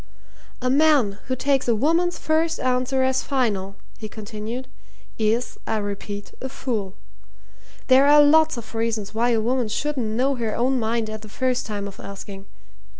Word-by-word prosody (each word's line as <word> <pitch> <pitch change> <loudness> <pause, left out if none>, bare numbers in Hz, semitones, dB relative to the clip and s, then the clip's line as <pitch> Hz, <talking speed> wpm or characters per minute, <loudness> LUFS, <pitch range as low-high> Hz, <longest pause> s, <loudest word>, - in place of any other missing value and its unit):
"A 255 - +2
man 275 -9 +3
who 260 - 0
takes 270 0 +1
a 235 - +3
woman's 330 +9 +1
first 320 +1 0
answer 255 +1 +1
as 260 0 +2
final," 205 -8 -1 0.2
he 215 - -6
continued, 220 +4 -6 0.5
"is, 225 +3 0
I 220 - 0
repeat, 205 0 -5
a 265 - -4
fool. 215 -8 -3 0.9
There 265 +2 +6
are 295 +1 +7
lots 315 0 +5
of 230 -1 -9
reasons 225 -2 -2
why 235 +2 +1
a 230 -2 +2
woman 245 +2 0
shouldn't 255 +2 -2
know 250 +6 +1
her 230 -4 -2
own 255 +2 +1
mind 225 0 0
at 215 0 -6
the 215 - -11
first 255 +2 -1
time 205 -2 -4
of 195 - -11
asking. 195 0 -9
235 Hz, 165 wpm, -23 LUFS, 215-265 Hz, 0.9 s, are